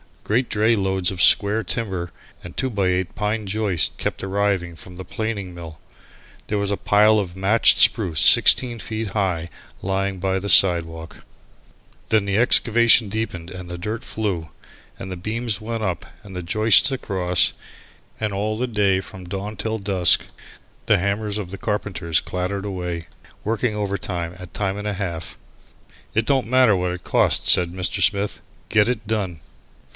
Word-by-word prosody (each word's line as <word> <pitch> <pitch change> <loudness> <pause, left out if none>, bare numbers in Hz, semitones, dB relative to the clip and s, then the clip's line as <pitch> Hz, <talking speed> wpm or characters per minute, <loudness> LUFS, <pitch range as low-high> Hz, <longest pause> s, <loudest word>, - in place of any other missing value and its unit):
Great 120 +4 0
dray 110 +2 +2
loads 95 -2 0
of 90 -2 -4
square 105 +4 +4
timber, 95 -4 -4 0.3
and 90 - -10
two 130 - -1
by 100 -5 -1
eight 90 0 -1
pine 105 +1 -2
joists 100 -4 0
kept - - -4
arriving 95 -3 -1
from 90 +2 -13
the 95 - -8
planing 100 -2 -5
mill. 85 -3 -10 0.7
There 105 - -2
was 100 0 -1
a 100 - -1
pile 105 +1 +3
of 90 -3 -5
matched 100 +4 +4
spruce 90 -10 +4
sixteen 120 - +5
feet 110 +2 -4
high 90 -5 -2 0.3
lying 95 0 -2
by 95 +1 -1
the 100 +2 -5
sidewalk. 80 -4 +4 0.9
Then 110 -2 +3
the 100 0 -1
excavation 120 -1 +5
deepened 95 -5 -5
and 90 -1 -9
the 85 - -6
dirt 105 +6 -5
flew, 95 -8 -3 0.5
and 95 - -8
the 90 - -5
beams 110 +3 -3
went 115 0 -5
up 90 -5 -3 0.2
and 100 - -12
the 90 - -4
joists 110 +8 +4
across, 95 -8 +1 0.7
and 110 -1 -2
all 105 +2 -2
the 125 +2 -2
day 100 -4 +1
from 95 -1 -12
dawn 100 +4 -6
till 110 0 -3
dusk 95 -3 +3 0.6
the - - +3
hammers 100 +2 -2
of 95 -4 -6
the 100 - -8
carpenters 95 -6 -2
clattered 95 +2 -4
away, 90 -4 -5 0.4
working 115 +1 -1
overtime 100 -4 -4
at 90 -1 -11
time 100 -1 -2
and 105 +1 -5
a 105 - -2
half. 90 -5 -6 0.8
"It 110 0 +1
don't 135 -3 +1
matter 125 -4 +4
what 90 -1 -1
it 90 - -8
costs," - - +2
said 90 -1 +2
Mr. 90 0 -2
Smith; 100 0 +1 0.3
"get 110 +1 +3
it 115 -3 -3
done." 100 -7 -3
100 Hz, 165 wpm, -21 LUFS, 90-110 Hz, 0.9 s, sixteen